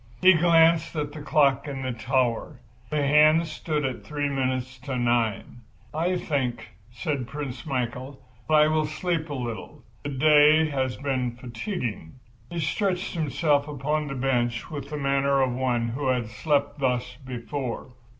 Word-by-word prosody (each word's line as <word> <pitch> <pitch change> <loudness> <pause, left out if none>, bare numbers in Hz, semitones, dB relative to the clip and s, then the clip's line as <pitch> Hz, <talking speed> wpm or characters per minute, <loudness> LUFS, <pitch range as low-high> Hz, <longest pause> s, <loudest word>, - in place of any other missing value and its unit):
He 185 +5 +7
glanced 165 -1 +4
again 150 -1 0
at 145 - -11
the 155 - -7
clock 140 -2 +2
in 135 -2 -5
the 130 - -1
tower. 120 0 -1 0.3
The 150 -2 0
hands 155 +3 +5
stood 155 -2 -2
at 130 -2 -4
three 145 -1 -2
minutes 130 -1 -2
to 135 -3 -4
nine. 120 -1 0 0.3
"I 175 +4 0
think," 125 -8 -2 0.2
said 120 +2 -3
Prince 140 +2 -6
Michael, 130 0 -3 0.3
"that - - +1
I 150 0 +6
will 155 -1 +1
sleep 165 +1 -2
a 145 - -3
little. 120 -3 -6 0.2
The 145 - -4
day 150 +3 +5
has 130 -2 -1
been 130 -3 -2
fatiguing." 120 - -5 0.4
He 170 - -4
stretched 185 +3 -1
himself 150 -2 +1
upon 150 +1 -2
a 135 - -4
bench 120 -2 -1
with 140 -2 -6
the 150 - -4
manner 140 0 +2
of 130 -2 +2
one 120 -2 0
who 130 +4 -3
had 125 -4 0
slept 145 +2 0
thus 125 -2 -1
before. 125 0 -5
140 Hz, 160 wpm, -26 LUFS, 125-150 Hz, 0.4 s, He